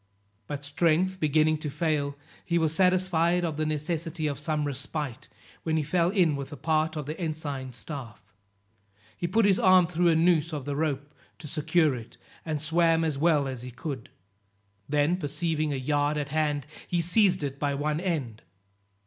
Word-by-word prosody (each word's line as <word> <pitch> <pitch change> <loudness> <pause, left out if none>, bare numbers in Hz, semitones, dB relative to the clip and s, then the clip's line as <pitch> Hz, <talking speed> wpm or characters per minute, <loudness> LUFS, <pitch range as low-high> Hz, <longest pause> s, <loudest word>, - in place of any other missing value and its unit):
But 145 0 -5
strength 170 +5 +1
beginning 155 0 +3
to 150 - -3
fail, 145 -1 -1 0.3
he 170 - 0
was 160 -2 +1
satisfied 180 -1 +2
of 160 -3 -2
the 155 +1 -1
necessity 155 +1 -2
of 145 -3 -2
some 150 -1 -1
respite, 140 -1 -4 0.3
when 160 -1 0
he 155 - +1
fell 170 +3 +2
in 180 -6 +3
with 140 +1 -6
part 160 0 +1
of 150 -2 -4
the 155 +5 -6
ensign 145 -5 -4
staff. 125 -1 -7 1.0
He 175 - -2
put 220 +4 +3
his 195 -2 +4
arm 185 -1 +6
through 175 +1 +1
a 165 - +5
noose 165 -1 +3
of 145 -4 -4
the 145 -1 -2
rope 145 -1 -2 0.2
to 160 - -12
secure 155 0 +2
it, 115 -3 -9 0.3
and 155 -2 -2
swam 165 +1 +2
as 155 -4 -1
well 150 -3 +3
as 130 -3 -5
he 125 - -7
could; 130 0 -6 0.8
then 150 +4 +2
perceiving 155 -1 -1
a - - -1
yard 145 +2 0
at 145 -1 -2
hand, 150 -2 0 0.2
he 175 - 0
seized 180 0 +3
it 140 -1 -4
by 145 -1 0
one 150 +2 -1
end. 150 - -2
155 Hz, 175 wpm, -27 LUFS, 145-170 Hz, 1.0 s, arm